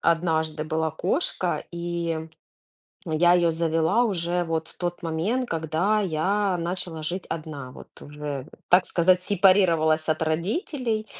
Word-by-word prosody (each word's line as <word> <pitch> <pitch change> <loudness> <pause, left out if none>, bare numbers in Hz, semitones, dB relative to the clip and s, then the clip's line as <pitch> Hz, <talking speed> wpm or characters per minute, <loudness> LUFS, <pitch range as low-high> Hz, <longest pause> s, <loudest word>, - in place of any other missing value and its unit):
однажды 160 -2 +1
была 160 +1 -1
кошка, 180 - -1
и 170 -1 -3 0.9
я 165 +2 +4
её 170 -1 +3
завела 165 +7 +2
уже 175 -4 -1
вот 165 -1 -2
в - - -17
тот 175 0 -4
момент, 185 +11 -1
когда 165 +6 0
я 195 +2 0
начала 170 -1 -4
жить 175 +4 -3
одна, 150 -5 -6
вот. - - -12
Вот - - -11
уже, 145 -2 -5 0.2
так 180 +1 +5
сказать, 180 +1 +3
сепарировалась 170 -5 +3
от 155 +1 +1
родителей, 215 - -1
170 Hz, 135 wpm, -25 LUFS, 160-185 Hz, 0.9 s, так